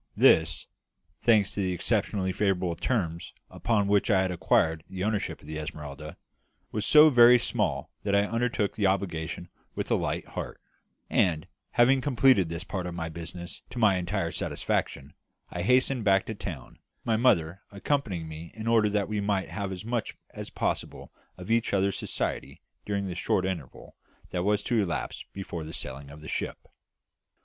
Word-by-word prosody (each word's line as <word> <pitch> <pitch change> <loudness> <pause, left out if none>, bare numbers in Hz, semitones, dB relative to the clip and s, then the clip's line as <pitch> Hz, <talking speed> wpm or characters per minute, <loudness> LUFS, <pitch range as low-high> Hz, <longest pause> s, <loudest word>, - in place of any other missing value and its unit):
This 80 0 +4 0.6
thanks 110 -4 +4
to - - -4
the 95 -1 0
exceptionally 95 +2 0
favourable 95 -3 0
terms 85 - -2 0.2
upon 105 -4 0
which 100 +2 +2
I 95 -3 +4
had 95 - -1
acquired 80 -2 +2
the 95 -1 -4
ownership 105 0 -1
of - - -16
the 80 +1 -5
Esmeralda 75 0 -7 0.5
was 105 -1 -1
so 155 0 +8
very 120 -1 +8
small - - -1
that 100 -1 0
I 100 0 +4
undertook 115 -2 0
the 100 -3 +1
obligation 90 -3 -2 0.3
with - - -3
a - - +5
light - - -2
heart; - - -6 0.5
and, 80 -5 +1 0.3
having 130 +2 +5
completed 130 - +4
this 85 0 -4
part 90 -3 -4
of 85 - -6
my 80 -1 -3
business 85 +2 -8
to - - -10
my 105 -5 +4
entire 90 -1 -2
satisfaction, 70 +1 -2 0.4
I 85 - -4
hastened 125 +4 +3
back 95 -1 +3
to 110 - -4
town, 105 - -8 0.3
my 115 - +2
mother 100 -7 +2
accompanying 100 - -2
me 80 +1 -9
in 110 0 -6
order 115 -2 +4
that 100 -1 0
we 105 -1 -2
might 100 -2 0
have 100 -2 -3
as 95 +2 -6
much 120 -1 -3
as - - -7
possible - - -3 0.3
of 90 +4 -6
each 115 -3 +2
other's 100 0 +1
society - - -3 0.2
during 100 -1 -1
the 95 - -4
short 90 +1 0
interval 85 -9 -6 0.4
that 90 - -1
was 105 +2 +1
to 120 -3 +1
elapse 85 -6 -3
before 90 -4 -6
the 80 +1 -8
sailing 70 +2 -7
of 75 +2 -12
the 80 - -10
ship. - - -4
95 Hz, 175 wpm, -28 LUFS, 85-110 Hz, 0.6 s, so